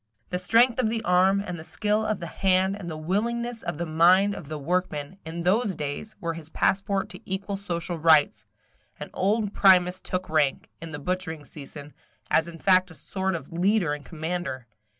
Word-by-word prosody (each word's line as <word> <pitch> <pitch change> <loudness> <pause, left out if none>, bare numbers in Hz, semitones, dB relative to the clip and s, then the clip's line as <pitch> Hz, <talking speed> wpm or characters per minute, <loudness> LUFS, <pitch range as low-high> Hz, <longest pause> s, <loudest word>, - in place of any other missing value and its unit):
The 180 - -1
strength 230 +6 +4
of 235 -4 +2
the 225 0 -2
arm, 185 +2 +4
and 180 -3 -5
the - - -8
skill 210 +5 0
of 215 -2 -1
the 170 - -5
hand, 190 +3 +1
and 190 -4 -7
the 160 - -5
willingness 230 +8 -2
of 170 -3 -4
the 170 - -2
mind 180 +5 +4
of 150 - -8
the 155 - -4
workman, 165 +1 -2
in 170 +1 -5
those 195 +2 +2
days, 150 +9 -5
were 170 -1 -2
his 160 -1 -8
passport 195 +2 0
to 185 0 -9
equal 195 +1 -4
social 175 -3 -4
rights; 155 -2 +4 0.6
and - - -7
old 205 +1 0
Primus 185 -2 +5
took 185 0 -3
rank, 150 -3 0
in 165 -1 -7
the 145 - -5
butchering 160 -1 -3
season, 145 0 -10 0.4
as 160 +1 +3
in 170 -1 -9
fact 185 +2 +4
a 160 - -12
sort 190 +1 -2
of 160 -1 -8
leader 180 -2 +2
and 150 -1 -6
commander. 160 -5 -4
180 Hz, 190 wpm, -26 LUFS, 160-195 Hz, 0.6 s, Primus